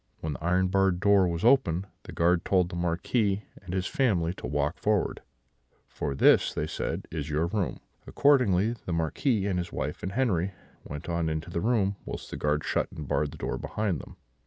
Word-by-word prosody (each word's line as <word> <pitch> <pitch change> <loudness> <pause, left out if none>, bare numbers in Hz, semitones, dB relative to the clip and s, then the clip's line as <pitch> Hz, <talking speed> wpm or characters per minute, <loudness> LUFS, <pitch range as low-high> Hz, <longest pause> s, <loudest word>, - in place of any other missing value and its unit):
When 80 -1 -3
the - - -9
iron 90 +2 +2
barred 95 -2 +2
door 100 -1 +4
was 85 +4 -2
opened, 100 -9 +4 0.2
the - - -8
guard 85 0 +2
told 90 -2 +2
the 90 - -6
Marquis 95 +4 0 0.2
and 90 -3 -8
his 95 0 -1
family 90 -11 +1
to - - -7
walk 75 0 -1
forward: - - 0 0.7
'For 70 -2 -4
this,' - - +4
said - - -3
they, 80 - -3
'is 75 0 -4
your 75 +2 +1
room.' 100 +2 -2 0.3
Accordingly, 115 -7 +3
the 90 - -1
Marquis 95 - 0
and 95 -3 0
his 85 - -4
wife 75 +3 -4
and 95 +2 -4
Henri 100 -8 +1 0.3
went 75 0 -7
on 85 -1 0
into 80 +1 -4
the 85 - -2
room, 100 -4 +1
whilst - - -7
the - - -4
guard 75 0 0
shut - - -1
and 75 -3 -7
barred 75 +2 +1
the - - -11
door - - -3
behind 105 -7 -2
them. - - -13
90 Hz, 200 wpm, -28 LUFS, 80-100 Hz, 0.7 s, door